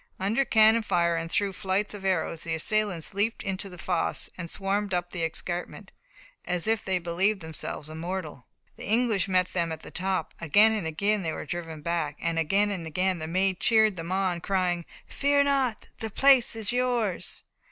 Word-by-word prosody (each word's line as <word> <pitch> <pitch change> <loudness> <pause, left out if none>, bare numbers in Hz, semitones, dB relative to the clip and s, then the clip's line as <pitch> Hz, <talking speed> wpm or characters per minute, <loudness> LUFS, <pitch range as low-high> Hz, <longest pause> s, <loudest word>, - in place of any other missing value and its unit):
Under 210 +8 +1
cannon 220 -1 +5
fire 170 -5 +1
and 165 0 -3
through 200 +2 0
flights 195 +2 -1
of 205 -2 -8
arrows, 165 -3 0
the 165 -1 -2
assailants 200 0 -1
leaped 205 +3 -1
into 195 -1 -3
the 180 - -11
fosse 175 -1 -1
and 170 -2 -6
swarmed 195 +1 -1
up 175 0 -2
the 170 - -3
escarpment, 175 +2 -4 0.5
"as 180 -1 0
if 220 0 +1
they 190 -1 +1
believed 180 +4 0
themselves 160 -2 -5
immortal." 160 -4 -5 0.3
The - - -8
English 220 -3 +2
met 185 -1 +1
them 170 -2 0
at 160 - -5
the - - -10
top; 185 -2 -2
again 205 +8 +6
and 210 -7 -2
again 200 +6 +1
they 160 -3 -2
were - - -6
driven 165 -2 -6
back, 165 -3 -1
again 170 +5 +1
and 175 -5 -4
again 185 +3 0
the 155 - -4
Maid 185 +2 +1
cheered 220 -3 +4
them 165 0 -6
on, 185 -2 0
crying: 180 -3 0 0.2
"Fear 285 0 +2
not! 270 -5 0
the 220 - -3
place 265 +1 +4
is 220 -2 -2
yours!" 245 -6 -1
185 Hz, 185 wpm, -27 LUFS, 170-210 Hz, 0.5 s, again